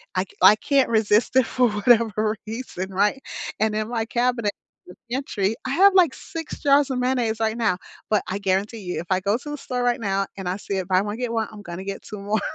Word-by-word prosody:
I - - +2
c - - -18
I 210 - +8
can't 275 +2 +2
resist 220 +2 +2
it 260 -3 +5
for 250 -2 +2
whatever 215 0 +2
reason, 215 -5 -5
right? 205 +7 +1 0.4
And 215 0 +1
in 215 0 -1
my 225 -2 -1
cabinet 240 -3 0 0.4
and 180 - -13
pantry, 225 -6 -1
I - - -2
have, 390 +6 +6
like, 350 -7 +4
6 325 -1 -7
jars 280 0 +4
of 260 - -1
mayonnaise 250 -3 0
right 220 0 0
now, 215 -6 +1 0.3
but 210 -2 +2
I 195 +2 -3
guarantee 200 +3 -1
you 180 -3 -4
if 170 - -6
I 185 - +3
go 200 +4 +1
to 295 - -9
the 295 - -4
store 250 -2 -3
right 245 +1 +1
now 195 -2 0
and 185 -2 -4
I 185 - -2
see 200 -1 -4
it 185 -1 -3
buy 185 0 +3
one, 210 +2 -4
get 245 -2 -3
one, 225 -2 -1
I'm 215 - -10
gonna 175 -1 -7
get 195 0 -5
2 210 - -9
more, 205 +2 0
220 Hz, 240 wpm, -23 LUFS, 200-250 Hz, 0.4 s, I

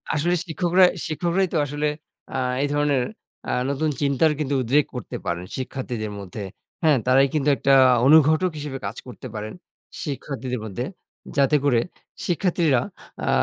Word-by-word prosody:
আসলে 175 +4 +1
শিক্ষকরা 180 +2 +3 0.2
শিক্ষকরাই 175 +4 0
তো - - +2
আসলে 145 +1 -2 0.5
আ - - 0 0.3
এই - - +1
ধরনের 145 -3 +2 0.5
আ - - 0 0.2
নতুন 150 +3 0
চিন্তার 145 +3 +3
কিন্তু 145 -1 0
উদ্রেক 140 +5 +3
করতে 125 - -6
পারেন 85 +1 -2
শিক্ষার্থীদের 125 -4 -4
মধ্যে। 100 +1 -7 0.4
হ্যাঁ? 155 -3 +5
তারাই 135 +2 +5
কিন্তু 150 -1 +2
একটা 135 +4 +3 0.3
অনুঘটক 155 +4 +5
হিসেবে 145 -2 -5
কাজ 100 - -4
করতে 125 - -9
পারেন 105 0 -5 0.5
শিক্ষার্থীদের 130 -4 -4
মধ্যে। 115 +5 -4 0.5
যাতে 140 +2 +4
করে 120 -4 +4 0.5
শিক্ষার্থীরা 170 -7 +2 0.4
আ - - 0
140 Hz, 145 wpm, -23 LUFS, 125-155 Hz, 0.5 s, হ্যাঁ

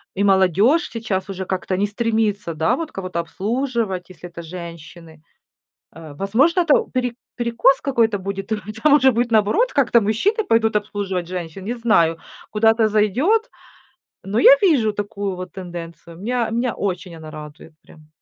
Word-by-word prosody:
и 200 - 0
молодежь 195 - +3
сейчас 205 -4 -3
уже 190 -1 -5
как-то 185 0 -2
не 205 - +1
стремится, 210 -4 -1
да, 160 +1 +1
вот 325 -2 -5
кого-то 185 -3 -4
обслуживать, 215 0 -2
если 175 0 -11
это 170 0 -9
женщины. 165 -2 -10 0.7
Э, 155 -2 -11
возможно, 260 - +2
это 320 -4 +4 0.2
пере 250 -2 -1 0.2
перекос 240 +2 +2
какой-то 230 -6 +1
будет, 195 +2 -5
а, - - +2 0.3
там 300 -1 +5
уже 265 -3 +5
будет 240 +1 0
наоборот, 225 - +2
как-то 240 -4 +3
мужчины 235 - 0
пойдут 225 - +2
обслуживать 195 -4 -3
женщин, 180 0 -6
не 235 +4 -3
знаю, 170 -9 +2 0.3
куда 220 +1 +4
это 225 -1 +2
зайдет. 260 - +1 0.7
Но 205 +4 -1
я - - +8
вижу 260 - +3
такую 205 -2 -4
вот 185 0 -7
тенденцию. 170 -3 -9
Меня 235 +3 -1
меня 235 0 -1
очень 180 -3 -4
она 160 -1 -10
радует 150 +1 -11
прям. 155 -1 -18
205 Hz, 160 wpm, -21 LUFS, 180-235 Hz, 0.7 s, я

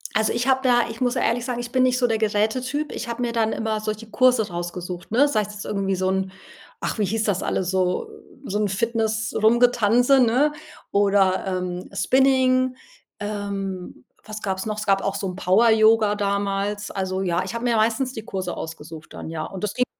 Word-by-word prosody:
Also, 220 0 +2
ich 240 +2 -1
habe 265 0 +2
ja 240 -1 +5
ich 230 +2 -9
muss 250 0 +1
ehrlich 245 -1 0
sagen, 245 -1 -3
ich 240 0 -6
bin 255 - +2
nicht 255 0 +3
so 250 - +2
der 225 -2 +1
Geräte-Typ. 245 +8 0
Ich - - -5
habe 235 +1 -4
mir 240 - -1
dann 225 -1 +1
immer 220 -1 -2
solche 215 +1 -5
Kurse 250 -3 +3
rausgesucht, 175 0 -6
ne? 275 +6 +4
Sei 220 -7 +1
es 210 0 -7
irgendwie 195 -2 -1
so 185 0 0
'n 190 0 -1 0.5
ach, - - -3
wie 210 - +2
hieß 220 +3 -1
das 200 -4 0
alles 185 -1 -1
so 185 - 0 0.4
so 210 -3 -2
'n 210 - +1
Fitness-Rumgetanze, 225 +3 +2
ne? 255 +5 +3 0.4
Oder, 200 -2 +3
ähm, 180 -1 -3
Spinning. 255 +2 +3 0.4
Ähm, 200 -7 -5 0.2
was 215 0 -8
gab's 190 -2 -2
noch? 215 -1 -3
Es 215 - -4
gab 195 -1 +3
auch 195 - -1
so 200 - -3
'n 180 - -5
Power 195 +5 +4
Yoga 220 -1 +4
damals. 200 0 -1
Also, 190 -1 -2
ja, 180 -1 0
ich 190 +5 -6
habe 235 - -4
mir 240 -1 +2
meistens 230 +4 +1
die 220 - -7
Kurse 190 -5 -4
ausgesucht 160 -1 -9
dann, - - -7
ja. 160 -1 -4
Und 190 0 -8
das 210 - -1
ging 250 - +1
215 Hz, 200 wpm, -23 LUFS, 195-240 Hz, 0.5 s, ja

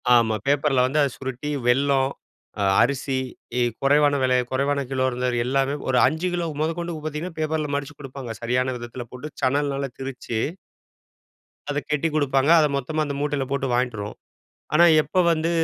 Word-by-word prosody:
ஆமா. 115 -2 +3
பேப்பர்ல 140 -2 +3
வந்து 140 +4 0
அதை 140 - +3
சுருட்டி 130 +2 -5 0.2
வெல்லம், 135 +1 +3 0.5
அ - - +2 0.2
அரிசி, 135 +1 +1 0.4
இ - - +2 0.2
குறைவான 145 +1 +4
விலை, 130 0 +3
குறைவான 140 +2 +1
கிலோ 130 -1 +1
இருந்ததுல 125 -1 0
எல்லாமே 135 +2 +1
ஒரு 125 - +2
5 160 +6 -1
கிலோ 175 -1 -1
முதற்கொண்டு 165 +2 -2
பார்த்தீங்கன்னா, 160 +3 -5
பேப்பர்ல 155 -1 -1
மடிச்சு 145 0 -5
குடுப்பாங்க. 135 -4 -7
சரியான 125 +2 0
விதத்தில 120 +1 -7
போட்டு, 125 +4 -7
சணல்னால 140 +1 0
திரிச்சு 130 -4 -4 1.3
அதை 145 0 0
கட்டிக் 150 +1 0
குடுப்பாங்க. 140 -1 +2
அதை 155 - +4
மொத்தமா 155 +4 -1
அந்த 140 -1 -4
மூட்டைல 145 -2 -1
போட்டு 140 -1 0
வாயின்ட்டு 120 -2 0
வருவோம். 105 +1 -6 0.6
ஆனா, 170 +3 +7 0.2
எப்போ 150 +5 0
வந்து 165 +1 0
140 Hz, 155 wpm, -24 LUFS, 130-150 Hz, 1.3 s, ஆனா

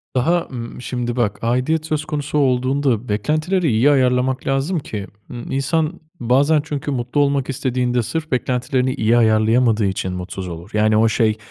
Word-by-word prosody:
Daha, 165 +7 +1
ımm, 120 -1 -7
şimdi, 120 -1 -3
bak, 105 -5 -1
aidiyet 130 +7 0
söz 155 -1 -2
konusu 150 -1 -3
olduğunda 130 -2 +1
beklentileri 155 - 0
iyi 115 +7 +4
ayarlamak 130 -1 +1
lazım 135 +6 0
ki, 105 -8 -6 0.2
ımm, 120 -1 -7
insan 155 +5 -1 0.2
bazen 140 +5 +3
çünkü 145 -1 -4
mutlu 125 +2 -1
olmak 140 -1 +1
istediğinde 125 -2 0
sırf 160 +6 -4
beklentilerini 125 +1 0
iyi 115 -2 +2
ayarlayamadığı 110 0 +3
için 95 -1 -2
mutsuz 90 +1 -6
olur. 85 0 -8
Yani, 110 0 +3
o 110 +1 +4
şey 110 -1 +1
125 Hz, 155 wpm, -20 LUFS, 115-145 Hz, 0.2 s, iyi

